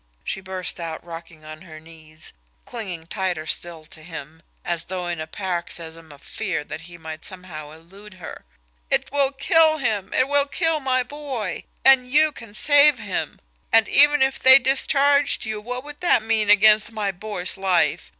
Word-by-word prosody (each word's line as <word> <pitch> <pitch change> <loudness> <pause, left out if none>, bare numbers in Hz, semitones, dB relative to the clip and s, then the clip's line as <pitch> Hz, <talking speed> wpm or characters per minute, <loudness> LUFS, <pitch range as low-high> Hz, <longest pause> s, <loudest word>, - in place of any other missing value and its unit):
she 195 - -4
burst 185 -1 -4
out, 165 -1 -6
rocking 165 -2 -11
on 155 +1 -10
her 160 -4 -12
knees, 160 -1 -9 0.3
clinging 185 -9 -7
tighter 180 -3 -3
still 165 0 -2
to 160 0 -8
him, 160 -1 -10 0.2
as 170 -1 -3
though 180 0 -5
in 170 -2 -4
a 155 - -6
paroxysm 165 -3 -6
of 140 -1 -16
fear 195 -8 -3
that 155 +2 -8
he 175 +1 -12
might 160 -1 -9
somehow 180 -6 -5
elude 185 +6 -15
her. 180 -3 -10 0.5
"It - - 0
will 280 -1 +1
kill 315 +3 +3
him 215 -8 -2
it 255 - +1
will 285 0 +1
kill 325 +1 0
my 260 -2 0
boy. 255 - -5 0.2
And 265 -2 +5
you 305 +2 +4
can 230 -7 -11
save 290 +2 +5
him! 205 -5 -5 0.3
And 225 -1 +5
even 295 -1 +5
if 265 0 -1
they 260 0 +8
discharged 275 +2 +2
you, 215 -1 -4
what 250 +3 -6
would 295 0 -11
that 345 -10 +2
mean 220 -2 +2
against 210 +1 +5
my 210 -3 -2
boy's 190 -1 -4
life! 190 -3 0
195 Hz, 175 wpm, -22 LUFS, 165-260 Hz, 0.5 s, they